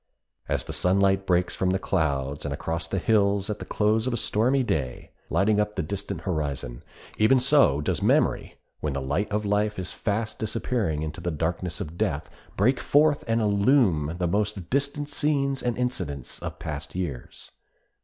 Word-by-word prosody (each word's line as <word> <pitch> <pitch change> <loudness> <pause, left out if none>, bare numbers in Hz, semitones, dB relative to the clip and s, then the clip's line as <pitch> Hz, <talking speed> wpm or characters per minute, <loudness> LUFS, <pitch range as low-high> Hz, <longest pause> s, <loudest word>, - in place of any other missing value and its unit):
As - - 0
the - - -7
sunlight 95 +1 +2
breaks 90 0 +2
from 95 - 0
the 95 - +2
clouds 70 -7 -1
and 75 - -3
across 80 +4 -3
the 95 - -2
hills 100 0 +2
at 105 - -5
the - - -6
close 110 +3 +1
of 130 - 0
a - - -2
stormy 125 +6 +2
day, 70 - -3 0.2
lighting 100 +5 +2
up 105 0 0
the - - -1
distant 100 +1 -4
horizon, 70 -8 -3 0.4
even 125 +5 +5
so 125 - +4
does 75 - -1
memory, - - +2 0.2
when 75 -2 -2
the 70 - -2
light 75 +11 -1
of 105 +1 -1
life 105 +1 +1
is 95 -1 -4
fast 110 +1 -2
disappearing 110 -7 -1
in 80 - -3
the 85 +2 -4
darkness 80 +2 -2
of 80 +3 -6
death, 75 -2 -1 0.3
break 125 +6 +3
forth 145 +3 +3
and 115 0 +2
illume 100 - +3
the 90 - 0
most 100 0 -1
distant 140 +2 0
scenes 140 -2 0
and 120 -2 -1
incidents 90 - -3
of - - -5
past - - -6
years. 85 -9 -5
100 Hz, 175 wpm, -26 LUFS, 80-110 Hz, 0.4 s, even